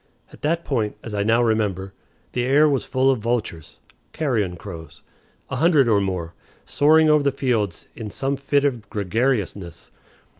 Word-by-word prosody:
At - - -15
that 165 +3 -1
point, 110 -7 -1
as 115 - -7
I 100 - -1
now 115 +3 +3
remember, 100 -4 -1 0.4
the 120 - -1
air 140 +4 +4
was 140 -3 0
full 130 +1 +2
of 130 - -1
vultures 110 -8 -3 0.4
(carrion 110 - -1
crows), 85 -5 -10 0.5
a - - -2
hundred 155 -3 +4
or 105 -3 +3
more, 90 -4 -3 0.3
soaring 155 +2 +4
over 150 -1 +5
the 140 0 +1
fields 115 -9 -1
in 110 -2 -6
some 135 +6 -2
fit 140 +1 0
of 120 -7 -2
gregariousness. 100 -4 -2
115 Hz, 160 wpm, -22 LUFS, 100-140 Hz, 0.5 s, over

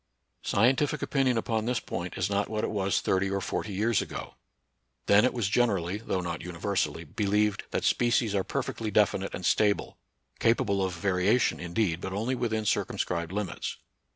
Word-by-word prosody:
Scientific 130 +7 +2
opinion 130 -4 +1
upon 110 -1 -1
this 125 0 0
point 90 +1 -5
is 90 - +1
not 100 0 0
what 110 -1 -2
it - - -1
was 100 -2 0
thirty 95 +1 +1
or 100 0 -1
forty 100 +3 -3
years 110 +3 +1
ago. - - -6 0.7
Then 100 +1 +6
it 125 - +3
was 120 -6 -1
gen 120 +4 +3
erally, 95 +2 -2
though 95 -4 -1
not 85 -2 -4
universally, 85 -2 -2
believed 105 +5 0
that - - -2
spe 120 - +2
cies 115 -3 +2
are 100 -2 +1
perfectly 110 +3 -3
definite 100 -1 +1
and 90 - -6
stable; 105 +2 +1 0.4
capable 100 -4 +2
of 95 -1 -2
variation, 95 +6 +2
indeed, 85 0 -1
but 95 - -4
only 110 +6 -1
within 110 -4 -1
circumscribed 85 -4 -1
limits. 100 -5 -3
100 Hz, 175 wpm, -28 LUFS, 95-110 Hz, 0.7 s, Then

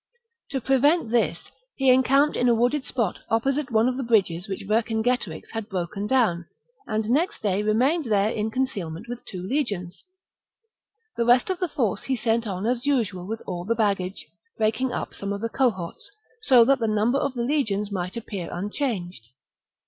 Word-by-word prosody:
To 275 - -2
pre 265 +2 +2
AUierbya - - -2
vent 290 -4 +3
this, 235 -1 0 0.2
he 270 -1 +4
encamped 275 +3 +4
in 245 - +2
a 235 - +4
wooded 245 +5 +1
spot 230 -8 -1
opposite 270 +5 +1
stratagem, 245 +2 +2
^^^ - - -2
^^ - - -4
^^^ - - -19
bodges 190 -4 +2
which 195 0 -5
Vcrcingetorix 220 -4 0
had 225 -1 -4
broken 190 +2 -3
down, 210 -10 +2 0.4
and 215 -1 -1
next 320 - 0
day 200 -1 +1
remained 255 +10 +2
there 210 -1 +2
in 215 -1 -1
concealment 215 -7 -3
with 245 0 -6
two 180 -2 -7
legions; 195 -7 -2 1.1
the 235 - +2
rest 245 +8 +4
of 370 - -3
the 360 - 0
force 225 -9 -1
he 265 - 0
sent 230 -1 0
on 190 0 -3
as 245 +3 -1
usual 205 -10 0
with 225 +1 -5
all 175 -2 -4
the 230 +5 0
baggage, 200 -4 -1 0.3
breaking 220 +4 +1
up - - -4
some 200 0 -5
of 200 0 -3
the 230 - -2
cohorts,^ 225 - -1 0.3
so 250 - +6
that 275 +1 +3
the 225 - 0
number 215 +5 +2
of 275 -2 -2
the 240 - -1
legions 215 -7 0
might 180 +2 -3
appear 200 -6 -5
unchanged. 180 - -3
225 Hz, 185 wpm, -25 LUFS, 200-255 Hz, 1.1 s, so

